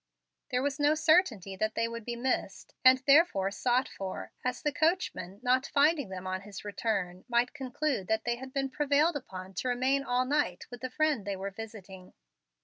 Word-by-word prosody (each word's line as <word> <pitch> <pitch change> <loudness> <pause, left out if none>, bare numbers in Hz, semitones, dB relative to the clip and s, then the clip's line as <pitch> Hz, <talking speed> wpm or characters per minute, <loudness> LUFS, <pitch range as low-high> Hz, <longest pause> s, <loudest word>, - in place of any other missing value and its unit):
There 250 -1 0
was 285 +1 -1
no 295 +1 +4
certainty 310 - +3
that 215 +2 -1
they 230 - +1
would 230 -1 -7
be 240 - -3
missed, 255 +2 -2
and 255 0 +8
therefore 275 - +4
sought 250 +5 +1
for, 190 -1 -6
as 255 - -2
the 295 - +1
coachman, 310 - 0
not 255 +1 +2
finding 290 - +3
them 185 -1 -7
on 185 0 -3
his 200 0 -10
return, 195 -4 -2
might 240 +1 +2
conclude 265 -6 -2
that 220 0 0
they 240 0 0
had 260 +1 -9
been 270 0 -2
prevailed 295 +3 +2
upon 190 -8 -7
to 220 - -3
remain 260 +3 +1
all 250 0 +1
night 280 -10 0
with 245 - -9
the 255 - -3
friend 300 -4 +1
they 200 0 -3
were 195 +1 -5
visiting. 195 -3 -10
245 Hz, 190 wpm, -30 LUFS, 200-280 Hz, -, and